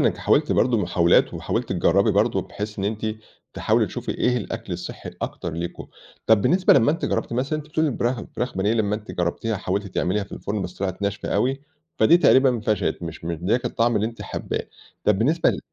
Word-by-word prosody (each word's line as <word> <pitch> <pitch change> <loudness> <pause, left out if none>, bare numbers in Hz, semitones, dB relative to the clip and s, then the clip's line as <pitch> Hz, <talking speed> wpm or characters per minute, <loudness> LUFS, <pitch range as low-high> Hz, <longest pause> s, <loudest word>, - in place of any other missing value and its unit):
إن - - +4
أنتِ - - 0
حاولتِ - - +2
برضه 120 -1 +3
محاولات، 85 -3 +3
وحاولتِ - - -2
تجربي - - +3
برضه - - +2
بحيث 105 0 -6
إن 95 - -2
أنتِ 110 +2 -2 0.5
تحاولي - - +2
تشوفي - - -4
إيه 125 0 +2
الأكل 115 - -5
الصحي - - -6
الأكتر 85 - -5
ليكم، 85 +2 -5 0.4
طَب 110 -2 +5
بالنسبة 180 - +4
لمّا 135 +1 +5
أنتِ 165 - -3
جربتِ - - -1
مثلًا، 135 +6 -1
أنتِ 150 - -8
بتقولي 155 +1 +1
الفراخ 120 -2 -1 0.2
فراخ 125 -3 -2
بانيه، 100 +3 +1
لمّا 105 -3 +1
أنتِ 110 0 -10
جرّبتيها 90 +6 -1
وحاولتِ 100 +1 -2
تعمليها 100 +2 -1
في - - -17
الفرن 100 -1 -3
بس 90 0 -6
طلعت 95 0 -4
ناشفة 100 0 -2
أوي، 135 +2 +1 0.4
فدي 170 - +6
تقريبًا 130 -8 +4
فشلِت، 105 -4 -1
مش 80 -1 -7
مدياكِ 90 +9 -1
الطعم 120 -1 +1
اللي 105 +1 +1
أنتِ 115 0 -7
حابّاه، - - -4 0.4
طَب 105 -2 +3
بالنسبة 155 +9 +3
ل - - -4
110 Hz, 200 wpm, -23 LUFS, 95-125 Hz, 0.5 s, فدي